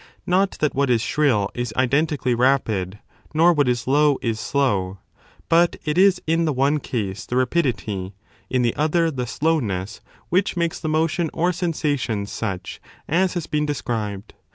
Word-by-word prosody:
Not 190 +2 +2
that 150 - +1
what 140 0 +1
is 120 -2 +3
shrill 120 -8 +1
is 120 -2 -3
identically 135 0 +1
rapid, 115 -7 +1 0.4
nor 170 +3 +5
what 145 -5 +2
is 120 -1 -1
low 145 +1 +3
is 115 -2 -1
slow, 105 -6 0 0.5
but 170 +1 +3
it 150 0 0
is 190 0 +5
in 165 +1 +1
the 155 - +1
one 140 +3 +2
case 100 -7 -4
the 125 - -3
rapidity, 115 - -1 0.3
in 125 -1 +1
the 115 - +1
other 165 +2 +1
the 125 -4 -4
slowness, 115 - -1 0.3
which 185 +1 +1
makes 170 -1 -1
the 155 - -3
motion 160 +1 +1
or 175 +2 +1
sensation 145 - -1
such 100 -3 -5 0.3
as 180 +4 +1
has 170 -3 -2
been 150 0 -1
described. 110 -7 -4
140 Hz, 160 wpm, -22 LUFS, 115-160 Hz, 0.5 s, nor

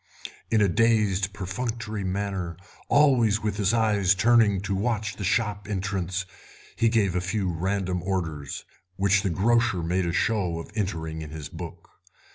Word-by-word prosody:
In 110 -2 +3
a - - +4
dazed 105 -1 +2
perfunctory 110 +2 -4
manner, 95 -3 -3 0.3
always 120 -8 +4
with 105 -2 -1
his 100 -2 +2
eyes 105 -4 +3
turning 110 -1 +4
to 100 0 -2
watch 105 +1 -1
the 100 - -5
shop 105 +1 0
entrance, 95 -2 -2 0.5
he 115 - +3
gave 105 -6 +1
a 90 - +1
few 95 0 -1
random 90 +1 -1
orders, 80 -7 -3 0.3
which 100 0 +3
the 100 - 0
grocer 115 +1 +2
made 90 +2 0
a - - 0
show 90 -2 0
of 85 - -8
entering 80 -7 -3
in 75 - -7
his 75 -2 -7
book. - - -9
100 Hz, 155 wpm, -26 LUFS, 90-110 Hz, 0.5 s, a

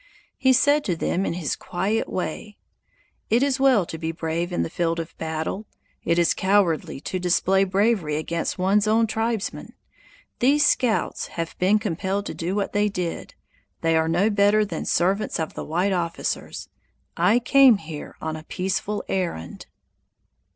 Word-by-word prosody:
He 260 - +3
said 285 +3 +4
to 180 - 0
them 185 +3 -1
in - - -1
his 170 -4 -2
quiet 200 +5 -2
way: 185 +4 -4 0.7
"It 235 +4 +3
is 280 -1 +1
well 260 -8 +4
to 160 - -7
be 160 0 -2
brave 165 +2 -3
in 175 - 0
the - - -4
field 170 -1 -1
of 165 0 -6
battle; 160 +6 -3 0.4
it 170 - +1
is 170 -1 +3
cowardly 190 -7 +1
to 185 - -3
display 185 +2 +2
bravery 195 -5 +1
against 165 +2 -2
one's 200 +3 +2
own 225 +1 +3
tribesmen. 225 -1 -3 0.7
These 290 +4 +4
scouts 245 -5 +1
have 165 -1 -3
been 190 +4 +4
compelled 200 0 -2
to - - -5
do 175 +3 -3
what 205 -1 -2
they 210 0 +2
did; 180 -4 -5 0.5
they 165 0 +2
are 160 0 +2
no 185 +6 +2
better 205 +1 +3
than 170 -5 -5
servants 195 +4 +1
of 160 - -3
the - - -6
white 180 +5 0
officers. 170 -2 -3 0.5
I 220 - +3
came 255 -1 +6
here 160 -4 -8
on 160 0 -4
a 155 - -7
peaceful 195 +4 -2
errand." 175 - -4
190 Hz, 165 wpm, -24 LUFS, 165-215 Hz, 0.7 s, came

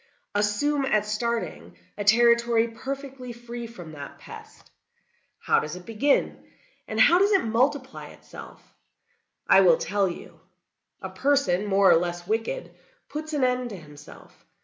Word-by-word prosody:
"Assume, 210 +8 0
at 215 -5 +1
starting, 210 - -4 0.2
a 205 - -4
territory 235 +1 +4
perfectly 265 +1 -7
free 235 0 -8
from 175 -9 -11
that 145 -2 -10
pest. - - -14 0.7
How - - +2
does 150 +2 -5
it 180 0 -11
begin, 255 +6 0 0.4
and - - -4
how 350 +2 +6
does 400 +2 +3
it 390 - +3
multiply 260 +4 -1
itself? - - -14 0.7
I - - +6
will - - +5
tell 205 - 0
you. 170 - -10 0.6
A - - -4
person, 210 -9 +1
more 195 -1 +4
or - - +6
less 175 0 -3
wicked, 225 - -3 0.4
puts 310 +1 -6
an 290 -3 0
end 250 -1 0
to 205 - -8
himself. 150 -3 -15
230 Hz, 145 wpm, -25 LUFS, 195-270 Hz, 0.7 s, how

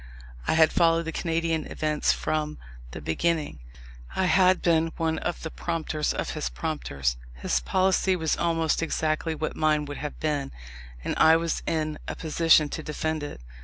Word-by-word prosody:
I - - +3
had 160 0 +5
followed 165 -1 +3
the 165 - -4
Canadian 165 -1 -1
events 155 -1 0
from 155 -1 -2 0.3
the - - -8
beginning; 160 - -1 0.6
I 190 - +1
had 185 +1 +4
been 165 -1 +3
one 160 -1 0
of 175 - -3
the 160 - -4
prompters 160 -3 -2
of - - -3
his 155 - -3
prompters; 70 - -2 0.2
his - - 0
policy 185 - +2
was 160 -3 0
almost 165 -2 +1
exactly 160 0 -1
what 155 0 -3
mine 155 -1 +2
would 145 0 -6
have 150 -1 -6
been, 145 -3 -1 0.5
and - - -1
I 160 0 +7
was 165 0 0
in 155 -1 -1
a - - -3
position 160 -1 +4
to 160 - -4
defend 155 +1 -2
it. 145 - -7
160 Hz, 165 wpm, -26 LUFS, 150-165 Hz, 0.6 s, I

